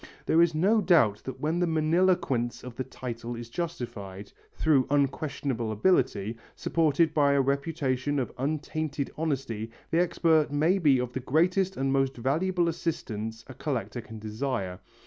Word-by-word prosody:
There 165 - +4
is 170 -2 +3
no 205 +7 +3
doubt 165 - +4
that 130 -1 -6
when 155 +4 0
the 175 - +2
magniloquence 160 -6 +1
of 125 -2 -8
the 130 - -2
title 120 -2 -6
is 115 0 -8
justified, 105 - -5 0.2
through 145 -5 +3
unquestionable 140 -4 0
ability, 115 - +1 0.2
supported 160 -1 +2
by 145 -2 +4
a 140 - +4
reputation 140 -1 -1
of 130 -4 -1
untainted 150 0 -2
honesty, 135 -8 -2 0.2
the 165 - +3
expert 160 -4 +2
may 160 +7 +2
be 145 -6 +4
of 125 0 -3
the 130 - -2
greatest 180 +8 +1
and 135 0 0
most 135 -1 +1
valuable 170 +8 +1
assistance 115 -9 -3
a 130 - -9
collector 130 -2 -3
can 110 -1 -10
desire. 110 -3 -3
140 Hz, 150 wpm, -28 LUFS, 120-160 Hz, 0.2 s, There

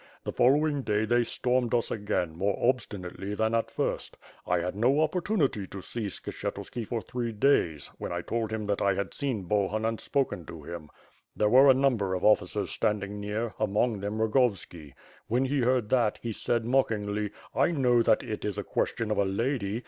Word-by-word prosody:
The - - -3
following 145 +2 +3
day, 105 -3 0
they 120 +2 +3
stormed 125 0 0
us 120 - 0
again, 90 -6 -1
more 100 +3 0
obstinately 105 -5 -2
than 110 +1 0
at 115 0 +1
first. - - -3 0.3
1 90 0 +1
had 90 +2 -3
no 125 +7 +3
opportunity 155 - 0
to 100 - -8
see 115 -3 -3
Skshetuski 110 +3 -5
for 115 -2 -3
three 120 -2 -3
days, 105 - +1
when - - -4
I 85 0 -3
told 115 +1 -2
him 110 -1 -3
that 100 -1 -1
1 100 -1 +2
had 100 0 -3
seen 130 -8 -2
Bohun 105 +3 0
and 115 0 -1
spoken 135 -11 -1
to 80 -3 -9
him. 85 -1 -8 0.5
There 105 - +2
were 130 +4 +7
a 130 - +7
number 120 -9 +1
of 90 - -2
officers 105 - +2
standing 105 -1 -1
near, 105 +2 -3
among 110 +1 +1
them 100 +2 -3
Rogovski. 105 - 0 0.3
When 125 +4 +1
he 140 +2 0
heard 125 -3 +1
that, 120 -5 +2
he 115 -1 -2
said 115 +2 -1
mockingly 105 -5 0 0.2
'i 145 - +3
know 125 -7 +3
that 110 - +3
it 110 -4 -5
is 105 -1 -2
a 100 - -2
question 110 +2 -1
of 105 - +1
a - - +4
lady. 110 +1 -1
110 Hz, 190 wpm, -28 LUFS, 100-125 Hz, 0.5 s, were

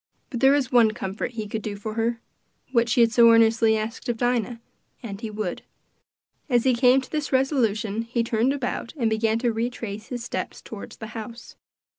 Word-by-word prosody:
But 240 - -3
there 270 +2 +6
was 275 -3 0
one 230 -3 +5
comfort 195 +5 -4
he 220 -2 -4
could 220 +1 -4
do 210 -1 -4
for 215 +2 -6
her 230 +1 -1 0.5
what 235 -2 +2
she 240 - +3
had 230 -1 +4
so 230 +1 +6
earnestly 225 -1 +4
asked 225 +4 -5
of 235 - -1
Dinah 245 -1 0 0.4
and 200 -3 -7
he 225 - -4
would. 210 -4 -4 0.9
As 240 -3 +3
he 260 - +3
came 250 +2 +4
to 260 - -13
this 300 -2 -2
resolution 225 -6 +1
he 230 0 -1
turned 230 +3 +1
about 270 -1 -3
and 230 -4 +1
began 220 0 +1
to 235 0 0
retrace 225 -2 -4
his 245 -2 -5
steps 245 - -4
toward 215 -3 -9
the 220 - -8
house. 230 +1 -8
230 Hz, 195 wpm, -24 LUFS, 220-245 Hz, 0.9 s, there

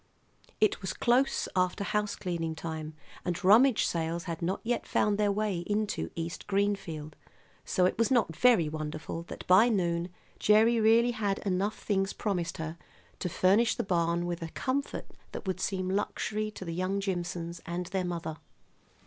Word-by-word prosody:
It 215 - +2
was 190 -2 -3
close 250 +3 +2
after 185 +1 +1
house 210 0 -1
cleaning 165 -3 -3
time, 160 -1 -5 0.3
and 180 +1 -3
rummage 225 +6 +6
sales 170 0 -1
had 165 -1 -5
not 180 +3 -1
yet 240 +1 -1
found 210 0 +1
their 205 -1 +3
way 205 -3 -1
into 210 0 -1
East 170 +2 -5
Greenfield; 195 -7 -1 0.5
so 180 - +2
it 185 - 0
was 230 - +3
not 235 - +2
very 230 -9 +5
wonderful 155 +1 -5
that - - -8
by 195 +7 +6
noon 175 -4 0 0.3
Gerry 220 +3 +5
really 230 +2 +5
had 205 -4 -1
enough 195 +2 0
things 195 -2 0
promised 185 -5 -2
her 160 +1 -5 0.4
to 180 - -2
furnish 200 +7 +3
the - - -1
barn 170 -2 +1
with 175 0 -3
a 165 - -4
comfort 270 +10 -2 0.3
that - - -6
would 185 -1 -2
seem 185 -1 -1
luxury 210 +2 -1
to 205 -3 -9
the 165 - -4
young 185 +3 -1
Jimsons 175 -3 -3
and 175 +1 -3
their 190 +1 -2
mother. 170 -3 -4
185 Hz, 165 wpm, -30 LUFS, 170-210 Hz, 0.5 s, rummage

